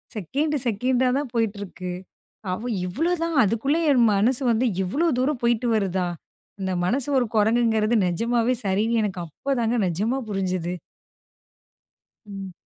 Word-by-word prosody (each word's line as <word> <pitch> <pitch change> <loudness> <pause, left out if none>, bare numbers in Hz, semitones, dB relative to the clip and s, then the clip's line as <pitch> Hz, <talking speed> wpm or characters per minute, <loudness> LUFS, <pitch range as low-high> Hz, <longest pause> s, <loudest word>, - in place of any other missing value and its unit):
Second 285 - -1
செகண்டா 250 +4 +1
தான் 285 -3 -3
போயிட்டிருக்கு. 200 -5 -2 0.6
அவ 220 +7 -3 0.2
இவ்வளோதான், 330 - -1
அதுக்குள்ள 230 +9 +1
என் 250 -4 +4
மனசு 240 +7 +2
வந்து 235 +3 +1 0.2
இவ்வளோ 285 - 0
தூரம் 265 0 0
போய்ட்டு 235 0 +2
வருதா? 190 -3 0 0.5
அந்த 190 0 -1
மனசு 255 +8 0
ஒரு 245 - +1
குரங்குங்கிறது 220 +1 +3
நெஜமாவே 230 +7 +1
சரின்னு, 215 +4 +1
எனக்கு 190 -3 -3
அப்போதாங்க 235 - -1
நெஜமா 210 +9 -1
புரிஞ்சுது. 185 -3 -2 1.5
ம். 195 -2 -7
225 Hz, 120 wpm, -24 LUFS, 195-255 Hz, 1.5 s, என்